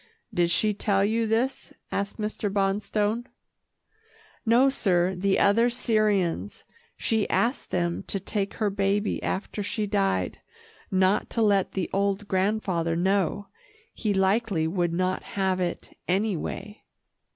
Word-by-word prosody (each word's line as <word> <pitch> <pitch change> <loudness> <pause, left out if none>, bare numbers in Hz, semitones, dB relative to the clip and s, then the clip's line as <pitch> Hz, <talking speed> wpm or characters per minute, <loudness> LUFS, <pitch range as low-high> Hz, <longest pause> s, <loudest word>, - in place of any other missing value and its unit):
"Did 175 -1 +2
she 210 +4 +2
tell 200 -1 +1
you 225 +2 +1
this?" 235 +5 -1 0.2
asked 200 0 -2
Mr. 210 -1 -2
Bonstone. 205 +3 0 1.2
"No, 240 +4 +5
sir, 185 -8 +2
the 195 +2 +1
other 230 +4 +4
Syrians. 215 -6 0 0.3
She 220 -3 0
asked 245 +4 0
them 175 -1 -1
to 195 - -1
take 200 +1 -2
her 210 -2 0
baby 200 +1 0
after 205 +2 -3
she 210 +1 -2
died, 195 - 0 0.5
not 190 +1 +2
to 230 - 0
let 200 -3 +2
the 190 -3 -1
old 200 +1 0
grandfather 185 -4 0
know. 195 +2 0 0.4
He 215 - -1
likely 195 -2 +2
would 175 0 0
not 185 +2 0 0.2
have 190 -1 +1
it, 175 -1 -3
anyway." 205 +2 -2
200 Hz, 130 wpm, -26 LUFS, 185-215 Hz, 1.2 s, No